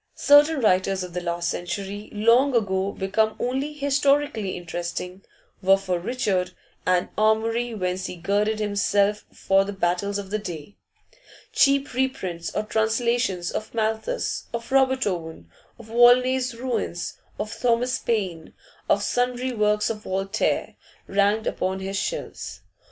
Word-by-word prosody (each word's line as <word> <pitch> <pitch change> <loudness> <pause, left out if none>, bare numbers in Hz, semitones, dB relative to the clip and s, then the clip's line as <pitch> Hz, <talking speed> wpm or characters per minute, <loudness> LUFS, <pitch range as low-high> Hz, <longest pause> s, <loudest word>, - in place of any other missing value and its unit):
Certain 290 +1 +5
writers 190 -2 +2
of 180 -1 -8
the 180 - -3
last 170 0 -2
century, 195 +4 -4
long 235 +6 +3
ago 195 -3 +1
become 215 +3 0
only 265 +4 -1
historically 280 -7 +1
interesting, 175 +2 -5 0.4
were 195 0 +5
for 185 -3 -2
Richard 190 -3 -1 0.3
an 180 -1 +2
armoury 225 +2 +1
whence 185 -1 -2
he - - -6
girded 205 +5 0
himself 205 0 +1
for 195 0 +2
the 200 +1 -5
battles 195 +2 0
of 200 -1 -7
the 215 - 0
day; 175 -1 -7 0.8
cheap 275 -1 +3
reprints 190 -10 -2
or 210 - 0
translations 220 -4 0
of 215 +2 -5
Malthus, 220 - -1
of 235 +2 -6
Robert 265 -1 +3
Owen, 165 - -4 0.3
of 235 - -13
Volney's 245 +2 +4
'Ruins,' 230 -8 -3 0.2
of 210 +1 -4
Thomas 245 +1 +1
Paine, 185 -8 -2 0.4
of 200 - +3
sundry 250 +2 0
works 210 -1 +1
of 215 - -5
Voltaire, 195 0 -1 0.3
ranked 205 +2 +2
upon 190 +1 -1
his 195 +1 -4
shelves. - - -4
210 Hz, 135 wpm, -24 LUFS, 190-240 Hz, 0.8 s, Certain